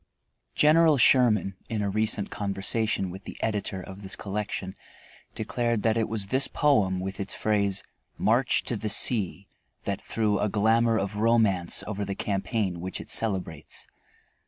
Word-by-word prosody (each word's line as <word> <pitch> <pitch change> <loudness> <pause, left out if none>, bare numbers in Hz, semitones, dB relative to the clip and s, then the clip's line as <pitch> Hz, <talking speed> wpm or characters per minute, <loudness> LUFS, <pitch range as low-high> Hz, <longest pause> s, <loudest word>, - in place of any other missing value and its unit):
General 155 0 +5
Sherman, 105 -8 +4
in 110 -2 -2
a 100 - -1
recent 110 -1 0
conversation 100 0 -1
with 95 +2 -10
the - - -8
editor 105 -3 -2
of 95 +2 -10
this 95 - -5
collection, 100 -2 -4 0.6
declared 115 0 -1
that 110 -1 +2
it 115 -2 0
was 110 -2 +1
this 130 +7 +2
poem 105 -11 +2
with 95 +1 -5
its 100 0 -2
phrase, 100 -3 +1 0.3
"march 120 +4 +2
to 120 - -2
the 110 0 -3
sea," 100 -3 +2 0.4
that 100 -1 -3
threw 105 -2 0
a 105 - 0
glamour 110 +2 +2
of 100 0 -3
romance 105 -6 +2
over 105 -1 -4
the 100 0 -4
campaign 95 -2 -2
which 95 +1 -5
it - - -8
celebrates. 95 -8 -1
105 Hz, 155 wpm, -26 LUFS, 95-115 Hz, 0.6 s, General